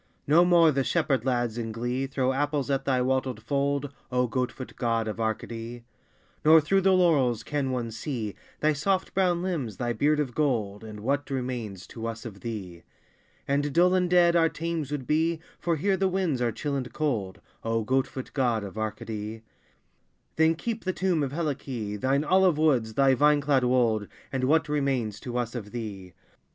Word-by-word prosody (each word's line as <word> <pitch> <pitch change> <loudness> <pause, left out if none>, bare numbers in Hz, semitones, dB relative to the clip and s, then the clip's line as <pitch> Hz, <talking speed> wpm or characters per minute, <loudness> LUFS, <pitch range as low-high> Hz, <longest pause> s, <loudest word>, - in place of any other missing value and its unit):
No 160 +5 +6
more 170 -2 +5
the 135 -1 +1
shepherd 135 -2 +1
lads 120 -3 0
in 115 -1 -3
glee 120 +4 -2
Throw 130 -1 0
apples 145 0 -1
at 135 0 0
thy 130 -2 +2
wattled 130 -2 0
fold, 140 +1 -1 0.2
O 125 0 +2
goat 125 +1 -1
foot 130 - -9
God 115 -2 0
of 110 +1 -4
Arcady! 115 +1 -4 0.6
Nor 160 +1 +8
through 195 +6 +2
the 190 0 +4
laurels 140 -11 +3
can 145 -3 -2
one 120 -3 -2
see 110 -2 -4 0.3
Thy 155 0 +3
soft 185 +6 0
brown 180 -2 +2
limbs, 140 - -3
thy 120 -1 -1
beard 150 +6 +2
of 135 -5 -1
gold, 110 -9 -1
And 105 -1 -8
what 140 +5 -1
remains 125 -8 -4
to 115 -1 -6
us 115 +1 -6
of 100 -4 -8
thee? 95 -7 -6 0.7
And 145 +1 +1
dull 180 +4 +4
and 180 -1 +2
dead 175 -1 +5
our 165 -1 +4
Thames 165 -4 -3
would 145 -3 -3
be, 160 +4 +1 0.2
For 170 -1 0
here 190 +5 +1
the 190 +1 +2
winds 180 -8 0
are 120 -1 +1
chill 145 +5 -3
and 130 -3 -3
cold, 115 -12 -2 0.2
O 115 0 0
goat 130 +3 +1
foot 130 - -7
God 120 -6 +1
of 100 +2 -7
Arcady! 110 0 -5 0.9
Then 160 +1 +4
keep 230 +6 -4
the 185 - -1
tomb 180 -4 +1
of 135 -2 -1
Helice, 135 -9 -3
Thine 135 +5 +1
olive 185 0 +4
woods, 125 -8 +2
thy 135 -1 +5
vine 150 +3 +4
clad 140 -2 +2
wold, 115 -4 +2 0.2
And 130 -1 0
what 160 +3 +3
remains 135 -8 -1
to 125 -1 -5
us 120 -2 -2
of 110 -5 -6
thee? 100 -6 -6
130 Hz, 190 wpm, -27 LUFS, 115-155 Hz, 0.9 s, Nor